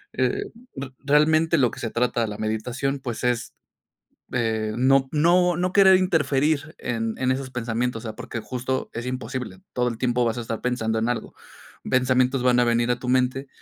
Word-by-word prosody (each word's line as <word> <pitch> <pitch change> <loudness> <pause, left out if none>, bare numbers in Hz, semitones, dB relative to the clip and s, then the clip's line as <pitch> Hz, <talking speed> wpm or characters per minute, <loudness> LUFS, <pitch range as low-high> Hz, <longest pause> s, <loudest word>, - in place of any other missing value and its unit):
Eh, 405 - 0 0.3
re 135 -1 -6
realmente 155 +3 +3
lo 125 -4 +3
que - - -10
se 115 - -3
trata 120 -1 0
la 105 0 -6
meditación, 120 +6 -2
pues 120 -3 -5
es, 125 -2 -1 0.8
eh, 110 -3 0
no, 135 +1 +4
no 175 +3 +3
no 180 +1 -1
querer 190 -1 +7
interferir 155 -4 +1
en 115 -2 -2
en 130 - +1
esos 130 0 -3
pensamientos, 120 -1 -2
o - - -3
sea, 110 - -6
porque 115 - -6
justo 125 +4 -3
es 120 +1 -5
imposible, 125 - -5
todo 125 0 +1
el 115 -1 -7
tiempo 125 -1 +1
vas 115 +1 -1
a - - -3
estar 115 -1 -4
pensando 115 -3 -1
en 115 +2 0
algo. 120 - -4 0.5
Pensamientos 130 0 +2
van 125 -1 +3
a - - +5
venir 120 0 +1
a 125 - +2
tu 125 - -4
mente 130 +2 +1
125 Hz, 190 wpm, -24 LUFS, 115-135 Hz, 0.8 s, querer